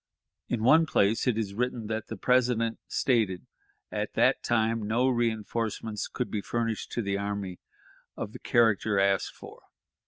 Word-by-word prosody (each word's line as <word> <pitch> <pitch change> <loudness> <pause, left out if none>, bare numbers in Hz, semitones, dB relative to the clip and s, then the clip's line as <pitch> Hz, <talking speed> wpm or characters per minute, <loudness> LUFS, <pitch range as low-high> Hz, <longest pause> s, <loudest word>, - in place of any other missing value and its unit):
In 115 -3 -2
one 160 +6 +6
place 110 -2 +2
it 120 -3 +2
is 105 -3 -2
written 120 +1 -2
that 110 0 -3
the - - -6
President 125 -2 +2
stated, 110 -8 +1 0.5
"At - - -3
that - - +3
time 115 -2 0
no 115 +4 +2
reënforcements 115 -3 -1
could 125 - -3
be 105 - -1
furnished 115 0 -2
to 120 - -1
the 100 0 -1
army 100 -3 -4 0.6
of 105 - -5
the - - -8
character 110 -4 +2
asked 100 -1 +1
for." - - -12
110 Hz, 155 wpm, -28 LUFS, 105-120 Hz, 0.6 s, one